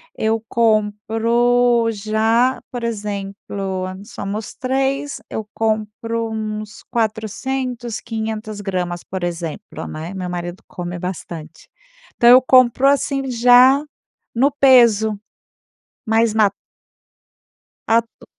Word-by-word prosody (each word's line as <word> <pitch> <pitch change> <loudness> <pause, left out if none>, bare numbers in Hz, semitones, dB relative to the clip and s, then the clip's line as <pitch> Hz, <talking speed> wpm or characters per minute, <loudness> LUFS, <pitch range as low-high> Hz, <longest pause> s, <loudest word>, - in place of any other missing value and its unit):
eu 220 0 0
compro 230 +2 +2
já 220 +4 +1
por 245 -2 -5
exemplo, 200 -3 -4 0.2
somos 210 -1 -6
3, 270 +2 -1
eu 215 -1 -5
compro 225 +1 -2
uns 215 0 -5
400, 235 +2 -2
500 220 -2 -5
gramas, 180 -3 -3
por 185 -1 -6
exemplo, 170 +3 -5
né. 160 +4 -6
Meu 180 -2 -4
marido 175 +1 -5
come 175 0 -6
bastante, 170 -3 -7 0.5
então 235 - +5
eu 255 +1 +9
compro 255 +1 +4
assim, 275 -1 +1
já 250 +4 +6 0.5
no 275 +4 +3
peso. 235 -6 +4 0.9
Mas 225 0 +2
ma 215 -2 +4 1.4
A 230 +1 +5
tu 230 - -21
220 Hz, 100 wpm, -19 LUFS, 200-245 Hz, 1.4 s, eu